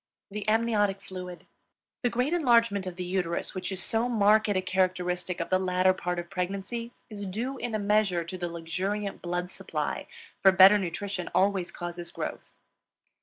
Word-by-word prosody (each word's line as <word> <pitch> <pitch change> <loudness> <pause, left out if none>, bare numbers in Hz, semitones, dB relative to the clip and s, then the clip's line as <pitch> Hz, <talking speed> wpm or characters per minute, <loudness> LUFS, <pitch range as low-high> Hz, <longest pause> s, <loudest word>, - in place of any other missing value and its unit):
THE 210 +1 -5
AMNIOTIC 215 -3 +2
FLUID. 180 -2 -8 0.6
The 245 - +2
great 250 +6 0
enlargement 235 - +3
of 180 - -5
the 180 - -4
uterus 180 -2 -2
which 185 +1 -4
is 190 -2 +1
so 230 +2 +2
marked 215 -1 +4
a 195 -2 +2
characteristic 180 -1 -1
of - - -4
the 185 - +4
latter 185 0 +3
part 180 -1 -3
of 175 +1 -5
pregnancy 195 +5 -3 0.2
is 205 -2 -6
due 245 +8 -3
in 235 -3 -3
a - - +2
measure 205 -4 +2
to 170 +3 -7
the 175 -1 -3
luxuriant 195 +5 -3
blood 175 +1 -3
supply, - - -4 0.3
for 190 - +7
better 190 +2 +8
nutrition 185 +1 -4
always 190 -2 +2
causes 175 0 -6
growth. - - -5
190 Hz, 170 wpm, -28 LUFS, 180-210 Hz, 0.6 s, better